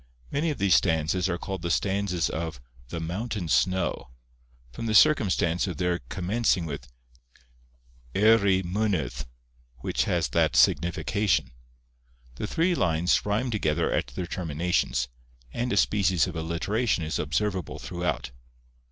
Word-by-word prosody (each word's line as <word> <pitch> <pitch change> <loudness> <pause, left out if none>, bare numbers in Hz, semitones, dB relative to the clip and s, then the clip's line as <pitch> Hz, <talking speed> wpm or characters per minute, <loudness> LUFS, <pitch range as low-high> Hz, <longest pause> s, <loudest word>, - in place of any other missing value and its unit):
Many 155 +4 0
of 150 - -2
these 100 -3 +3
stanzas 80 +4 +2
are 85 - -1
called 95 0 -5
the 85 - -3
stanzas 90 +2 0
of 80 -4 -4 0.3
'The 85 - -5
Mountain 90 +2 -4
Snow,' 90 -9 +1 0.6
from 115 - -5
the 110 - 0
circumstance 95 - +4
of 90 -5 -4
their 90 0 0
commencing 95 -1 0
with 80 - -6 1.3
'Eiry 100 -2 +4
Mynydd,' 85 - -1 0.6
which - - 0
has - - 0
that 80 0 +2
signification. 85 - +2 0.9
The - - -3
three 170 - +1
lines 85 - +2
rhyme 115 +5 0
together 80 -9 0
at - - 0
their 60 +9 -5
terminations; 85 -7 -1 0.5
and 120 +1 -2
a 100 - +1
species 95 -4 +3
of 90 -2 -6
alliteration 85 +5 -1
is 80 - -2
observable 95 +5 -2
throughout. 90 -7 -3
90 Hz, 130 wpm, -26 LUFS, 80-105 Hz, 1.3 s, circumstance